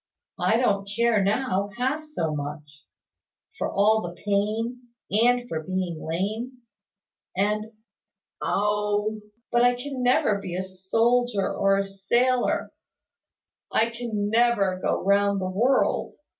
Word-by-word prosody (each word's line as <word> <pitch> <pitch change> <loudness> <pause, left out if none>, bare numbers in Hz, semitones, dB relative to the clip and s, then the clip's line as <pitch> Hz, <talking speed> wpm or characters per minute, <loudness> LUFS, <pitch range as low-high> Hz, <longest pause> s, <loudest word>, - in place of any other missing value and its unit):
I 225 - +3
don't 200 -5 +1
care 235 -3 +3
now, 200 -1 0
half 265 +5 -1
so 170 - -3
much, 150 0 -7 0.7
for - - -1
all 215 +2 +3
the 175 -2 -7
pain, 215 +4 -1 0.3
and 245 +3 +3
for 160 -8 -3
being 180 -1 -3
lame, 220 +9 -3 0.7
and 210 +2 0 0.7
Oh! 210 +1 0 0.3
But 240 - +3
I 245 0 +4
can 260 +1 -5
never 245 -4 +3
be 180 -3 -6
a 185 - -2
soldier 215 +4 +1
or 195 0 +2
a 195 - 0
sailor 240 +6 +1 1.0
I 225 +1 +2
can 225 -3 -3
never 220 -5 +2
go - - 0
round 200 0 +3
the 185 0 -2
world! 245 +8 +1
210 Hz, 125 wpm, -25 LUFS, 195-240 Hz, 1.0 s, I